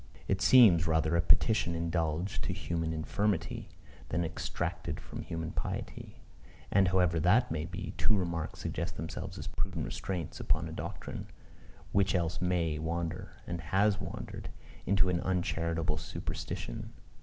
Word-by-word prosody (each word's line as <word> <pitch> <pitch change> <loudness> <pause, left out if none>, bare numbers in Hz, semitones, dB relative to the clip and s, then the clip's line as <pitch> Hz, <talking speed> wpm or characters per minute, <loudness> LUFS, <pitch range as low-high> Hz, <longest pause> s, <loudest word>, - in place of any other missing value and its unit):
It 95 -1 +1
seems 90 -9 +7
rather 80 0 +2
a 85 - +4
petition 90 0 +4
indulged 85 +1 -1
to - - -1
human 85 -1 -2
infirmity, 90 +4 -1 0.4
than 85 +2 +1
exacted 80 -1 -3
from - - -7
human 80 -1 -4
piety. - - -5 0.5
And, 95 -1 +5
however 90 -2 +3
that 110 +10 +4
may 80 -1 -1
be, 90 +1 -5
two 110 - +3
remarks 85 -4 -2
suggest - - -3
themselves - - -5
as - - -6
prudent 90 -3 -2
restraints 90 -5 -4
upon - - +1
a - - -6
doctrine, - - -5 0.6
which 100 0 +3
else 85 -2 0
may 85 -4 +1
wander, 85 +1 -3
and 85 -1 -4
has 100 +5 +2
wandered, - - -6 0.4
into 95 -1 +4
an 85 -1 +1
uncharitable 85 -3 0
superstition. 75 -5 -5
85 Hz, 140 wpm, -32 LUFS, 80-95 Hz, 0.6 s, seems